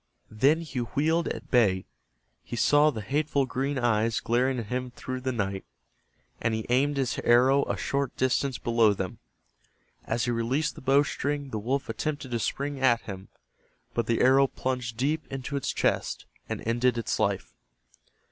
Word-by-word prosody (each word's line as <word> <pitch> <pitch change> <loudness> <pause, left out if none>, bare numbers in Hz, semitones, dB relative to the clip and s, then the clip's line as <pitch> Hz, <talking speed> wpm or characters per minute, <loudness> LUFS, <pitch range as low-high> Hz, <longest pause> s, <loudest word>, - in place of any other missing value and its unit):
Then 140 +10 +3
he 150 -6 -5
wheeled 155 +8 0
at - - -6
bay. 100 -7 +3 0.6
He - - -6
saw 145 +6 +4
the 110 -7 -5
hateful 140 +3 0
green 135 +2 -2
eyes 115 -2 +1
glaring 125 +3 +1
at 115 - -3
him 125 +3 -3
through 130 +1 -6
the 130 0 -1
night, 100 -5 -2 0.8
and 115 -1 +1
he 110 - -3
aimed 140 +3 +2
his 135 -2 -1
arrow 130 +4 +4
a - - -2
short 140 -2 -2
distance 130 +1 +1
below 115 -3 +3
them. 95 -1 -5 0.9
As 115 0 0
he 120 - 0
released 125 +7 0
the - - -11
bow 135 +2 +4
string 145 -1 -3
the 110 - -2
wolf 135 +6 -1
attempted 145 -4 -3
to 120 - 0
spring 140 +5 -2
at 120 -3 +3
him, 95 -2 -8 0.7
but 115 - -1
the 115 - +1
arrow 135 +2 +5
plunged 125 -4 -3
deep 150 +6 0
into 135 +1 -4
its 140 - -1
chest - - -1 0.2
and - - -4
ended 120 +1 +2
its 115 - -2
life. - - -1
125 Hz, 170 wpm, -27 LUFS, 115-140 Hz, 0.9 s, arrow